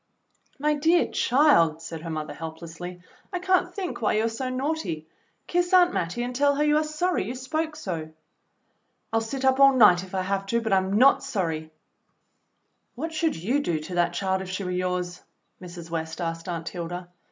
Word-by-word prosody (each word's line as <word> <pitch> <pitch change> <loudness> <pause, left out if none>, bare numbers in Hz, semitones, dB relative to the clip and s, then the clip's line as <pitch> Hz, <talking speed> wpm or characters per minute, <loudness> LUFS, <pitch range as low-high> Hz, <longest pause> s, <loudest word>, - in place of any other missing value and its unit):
"My 300 +1 +1
dear 325 +4 +3
child," 240 - +4
said 165 -1 -7
her 165 - -6
mother 155 -1 -4
helplessly. 165 +2 -8 0.3
"I 365 - -1
can't 365 0 +1
think 365 -6 -5
why 215 - +2
you 215 - +2
are - - +1
so 255 +3 -4
naughty. 255 - -2 0.4
Kiss 355 +1 0
Aunt 355 -1 +6
Mattie 180 +8 -2
and 245 0 -4
tell 285 +2 +3
her 295 - +1
you 300 0 +3
are 310 - +2
sorry 310 +4 0
you 240 +5 -4
spoke 310 +5 -3
so." 170 - -5 1.0
"I'll 225 - +3
sit 265 +4 -4
up 265 0 +3
all 275 -1 +7
night 180 -7 +6
if 190 0 -8
I 185 - 0
have 195 +1 -2
to, 235 +3 +1
but 220 -3 -1
I'm 190 0 +2
not 255 +6 +5
sorry.", 165 -12 -2 1.3
"What 320 +6 -4
should 320 0 0
you 220 - 0
do 170 - -1
to 155 +4 -8
that 175 -1 +1
child 190 -1 0
if 190 - -7
she 190 +1 -3
were 180 - -3
yours.f^" 180 -1 -2 0.4
Mrs. 175 -2 -9
West 160 0 -4
asked 165 +1 -4
Aunt 165 -1 -3
Hilda. 175 +1 -6
200 Hz, 195 wpm, -26 LUFS, 175-285 Hz, 1.3 s, all